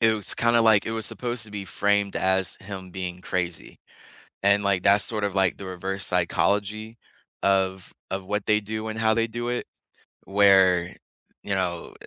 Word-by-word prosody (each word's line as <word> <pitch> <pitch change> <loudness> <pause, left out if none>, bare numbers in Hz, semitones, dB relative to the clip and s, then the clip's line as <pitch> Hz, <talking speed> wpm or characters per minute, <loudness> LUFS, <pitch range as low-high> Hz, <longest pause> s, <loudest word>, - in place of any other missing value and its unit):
it 115 -1 +4
was 105 - +2
kinda, 115 0 +3
like 110 -3 +4
it - - -2
was 110 -2 -1
supposed 120 -2 -2
to 105 - -6
be 100 -1 -6
framed 100 0 0
as 95 0 +1
him 95 -2 -8
being 90 -1 -6
crazy. 90 -3 -4 0.7
And, 100 0 +4
like, 100 -2 +1
that's 100 +1 +5
sort 110 -2 -1
of, 100 -1 -2
like, 95 -2 +2
the 100 - -9
reverse 95 0 -3
psychology 105 +2 0 0.5
of 95 -1 0 0.2
of 95 0 -4
what 105 +1 -3
they 105 0 +4
do 110 +1 -5
and 110 0 -5
how 110 0 +2
they 115 0 +1
do 120 +2 -4
it, 120 - -3 0.6
where, 95 -3 +4 0.5
you 100 - -2
know, 90 -3 -3
100 Hz, 180 wpm, -24 LUFS, 95-110 Hz, 0.7 s, that's